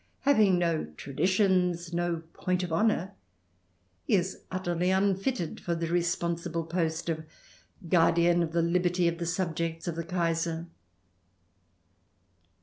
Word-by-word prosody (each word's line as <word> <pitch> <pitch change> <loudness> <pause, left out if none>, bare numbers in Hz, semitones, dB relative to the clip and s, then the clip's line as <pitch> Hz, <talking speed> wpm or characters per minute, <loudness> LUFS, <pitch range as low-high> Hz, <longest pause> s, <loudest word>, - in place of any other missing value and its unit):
Having 215 -10 +4
no 170 -2 0
traditions, 180 +2 +1
no 170 -1 -1
point 185 0 -1
of 175 -2 -3
honour, 190 0 +1 1.0
he - - +4
is 190 0 -1
utterly 180 -1 -1
unfitted 195 +1 0
for 170 - -2
the 165 0 -2
responsible 170 -1 -1
post 165 0 -2
of 160 -1 -2 0.6
guardian 170 0 +4
of 165 -1 -1
the 170 0 +1
liberty 175 +1 +2
of 170 0 -1
the 170 - -2
subjects 165 -2 -2
of 170 - -2
the 165 - -3
Kaiser. 165 -1 -1
175 Hz, 125 wpm, -29 LUFS, 165-185 Hz, 1.0 s, Having